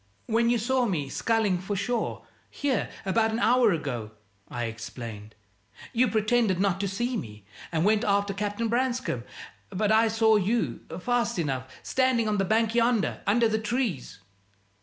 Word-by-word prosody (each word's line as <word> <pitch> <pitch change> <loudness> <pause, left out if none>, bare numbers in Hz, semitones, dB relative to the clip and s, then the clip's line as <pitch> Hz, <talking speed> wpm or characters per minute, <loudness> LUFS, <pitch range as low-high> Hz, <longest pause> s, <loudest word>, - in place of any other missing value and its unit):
"When 230 +1 +2
you 240 - +3
saw 250 +2 +1
me 150 -9 -2
sculling 215 0 +1
for 190 +3 -3
shore, 235 +4 -2 0.2
here, 275 -6 -1 0.2
about 220 +3 +2
an 220 - -1
hour 235 0 +4
ago," 130 - -3 0.4
I 120 - -4
explained, 115 -1 -7 0.6
"you 250 +2 +3
pretended 220 -3 +2
not 195 -1 +1
to 200 - -1
see 240 +6 -2
me, 105 - -7 0.3
and 165 0 +1
went 215 0 +3
after 200 0 +1
Captain 205 +3 -2
Branscome; 240 - -1 0.5
but 210 +2 0
I 220 +1 +5
saw 220 0 +4
you, 215 +4 0 0.2
fast 235 +2 0
enough, 130 -5 -2
standing 255 -4 +1
on 210 -1 0
the 195 - +2
bank 220 +3 +2
yonder, 235 -2 +1
under 230 +3 +4
the 220 0 0
trees." 220 - -2
215 Hz, 160 wpm, -27 LUFS, 185-235 Hz, 0.6 s, I